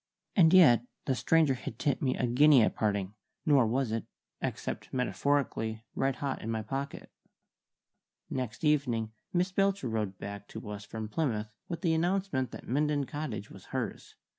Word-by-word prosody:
And 165 -5 +6
yet 145 - +7 0.2
the 135 - +2
stranger 140 +5 +3
had 125 -3 -6
tipped 140 +1 0
me 130 -2 +1
a - - +1
guinea 130 +1 +6
at - - +2
parting, 100 -2 -1 0.3
nor 140 -6 +5
was 125 +1 0
it 115 -1 -2 0.4
(except - - -4
metaphorically) 125 -4 0
red 135 -1 0
hot 140 -2 -3
in 110 - -5
my 110 -1 -1
pocket. 135 +6 -5 1.2
Next 125 -2 -4
evening 125 -8 +1 0.2
Miss 180 +1 +1
Belcher 195 -8 +1
rode 105 -4 -2
back 100 +1 -7
to - - -8
us 100 0 -7
from 110 0 -5
Plymouth 110 -4 -1 0.2
with 170 - -5
the 170 -4 +2
announcement 170 -5 0
that - - -10
Minden 145 +2 +1
Cottage 125 -9 -5
was - - -12
hers. - - -5
130 Hz, 165 wpm, -30 LUFS, 110-150 Hz, 1.2 s, yet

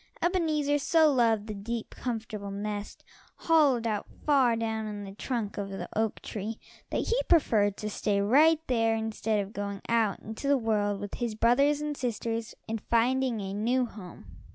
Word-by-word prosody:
Ebenezer 310 -5 +1
so 310 +1 +4
loved 225 -4 +2
the 215 - -5
deep, 225 +3 -5
comfortable 220 -4 -5
nest, 205 +1 -5 0.3
hollowed 290 -8 +3
out 215 -3 -1 0.2
far 265 -6 +4
down 220 -1 -2
in 205 -1 -5
the 195 - -8
trunk 220 -2 -3
of 200 -1 -3
the 195 -2 -5
oak 220 -1 -1
tree, 215 +2 -5 0.3
that - - -2
he 480 +2 +2
preferred 210 - +3
to 210 - -4
stay 205 -1 0
right 295 +10 +5
there 225 -3 +2
instead 220 -1 -1
of 200 +1 -4
going 200 -1 -4
out 225 -4 +1
into 220 +6 -6
the 280 0 +4
world 210 -4 0
with 205 0 -6
his 235 -3 -3
brothers 275 +6 +3
and 300 -1 -2
sisters 230 -3 -3
and 225 -1 -3
finding 245 0 +2
a 195 0 -4
new 245 +5 +1
home. 185 - -11
225 Hz, 175 wpm, -29 LUFS, 205-260 Hz, 0.3 s, right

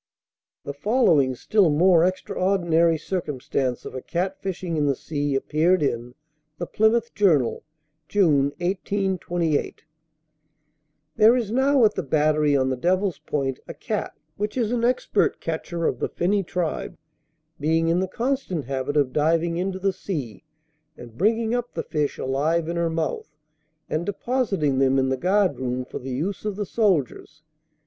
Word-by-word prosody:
The 140 - -5
following 150 - +2
still 200 - +2
more 165 +2 +4
extraordinary 175 -2 +1
circumstance 140 -7 -3
of - - -7
a 130 - -5
cat 185 +6 -3
fishing 185 -3 -3
in 150 -2 +1
the 140 - +2
sea, 145 0 -2
appeared 155 +5 +2
in 120 -2 -2 0.4
The 175 - -3
Plymouth 225 +5 +1
Journal, 160 - +2 0.5
June, 160 -9 +3 0.2
1828: 180 -4 -1 1.3
"There 225 +2 +6
is 230 -5 -1
now 265 0 +4
at 210 - +3
the - - -2
battery 150 -1 +2
on 130 0 +1
the - - 0
Devil's 185 +5 0
Point, 135 -3 -2
a - - -8
cat, - - -4 0.2
which 210 +4 -3
is 230 -3 0
an 240 -1 0
expert 240 -3 +1
catcher 165 +1 -3
of - - 0
the - - -1
finny 200 +3 0
tribe, 180 -2 -3 0.6
being 160 +2 +1
in 170 +2 +2
the 190 - 0
constant 230 - -2
habit 135 +2 -2
of 135 -3 +2
diving 165 +2 +1
into 185 +1 -2
the 195 0 0
sea, 150 - -5 0.5
and 120 -2 -12
bringing 220 - +1
up 245 0 -3
the - - -2
fish 150 -2 -2
alive 155 +5 0
in 170 - -3
her 170 -1 0
mouth, 160 -1 -3 0.6
and 155 +4 -2
depositing 200 - 0
them 135 0 +3
in 130 0 +2
the 130 - +1
guard 185 +6 +1
room 125 0 -2
for - - -7
the 130 - -7
use 160 +10 -3
of 210 -2 -2
the 205 0 -3
soldiers. 160 - -1
170 Hz, 155 wpm, -24 LUFS, 145-200 Hz, 1.3 s, There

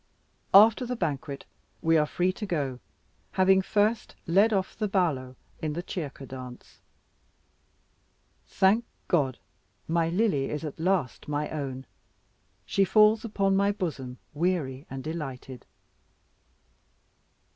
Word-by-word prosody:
After 220 +4 +8
the 250 - -2
banquet, 140 - -3 0.4
we 165 0 +4
were 150 -1 +3
free 180 +3 0
to 210 - -5
go, 140 -8 -2 0.5
having 190 0 +4
first 215 +3 0
led 200 +7 +4
off 190 -3 -1
the 215 - -1
ballo 150 -10 0 0.3
in 155 -1 -2
the 175 +3 -4
Cerca 150 -8 -6
dance. 130 -1 -10 1.7
Thank 200 +5 +3 0.2
God, 140 -8 +1 0.5
my 165 0 +1
Lily 175 -7 +1
is 150 +1 -4
at 150 - -7
last 175 -6 0
my 150 0 -2
own; 135 -3 -4 0.8
she 195 - +2
falls 215 +3 +5
upon 200 -3 +1
my 200 +1 +3
bosom 140 -11 -4 0.2
weary 150 -5 -1
and 135 0 -6
delighted. 135 -5 -6
165 Hz, 120 wpm, -27 LUFS, 135-195 Hz, 1.7 s, After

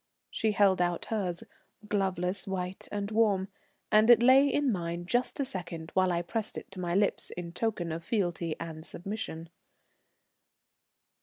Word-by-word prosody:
She 220 -1 0
held 195 -3 +4
out 175 -1 0
hers, 180 -5 -2 0.4
gloveless, 190 -2 0
white 185 -1 -4
and 205 0 -3
warm, 205 -4 +2 0.4
and 215 +2 +5
it 240 -1 +8
lay 265 +3 +7
in 290 -2 +2
mine 170 -2 -3
just 245 +9 0
a 275 - +1
second 170 -6 -6
while 185 -1 +3
I 170 0 0
pressed 220 +4 -2
it - - -8
to 195 - -7
my 175 -1 -1
lips 200 0 +1
in 175 -1 -6
token 175 -4 -2
of 165 +1 -4
fealty 175 -5 -1
and 160 -1 -6
submission. 170 -3 -6
190 Hz, 155 wpm, -30 LUFS, 175-215 Hz, 0.4 s, it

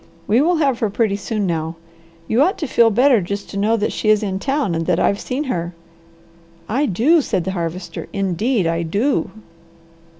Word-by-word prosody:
We 225 +8 +3
will 345 +4 +3
have 275 -6 +1
her 220 - 0
pretty 205 0 0
soon 205 +1 -3
now. 165 -2 -2 0.5
You 230 +4 +2
ought 370 +8 +2
to 310 - -3
feel 230 -2 +4
better 245 +1 +4
just 200 +3 -5
to - - -8
know 215 +3 +2
that 210 - -1
she 215 - -1
is 215 0 +4
in 190 -2 -2
town 275 - -1
and 165 0 -2
that 180 -1 +2
I've 200 - +1
seen 265 +4 -3
her." 175 - -3 0.9
"I 275 +6 0
do!" 270 - +3
said 195 -9 -1
the 190 - -3
Harvester. 170 -1 -5
"Indeed 200 +2 0
I 165 0 0
do!" 205 - 0
210 Hz, 195 wpm, -19 LUFS, 180-255 Hz, 0.9 s, feel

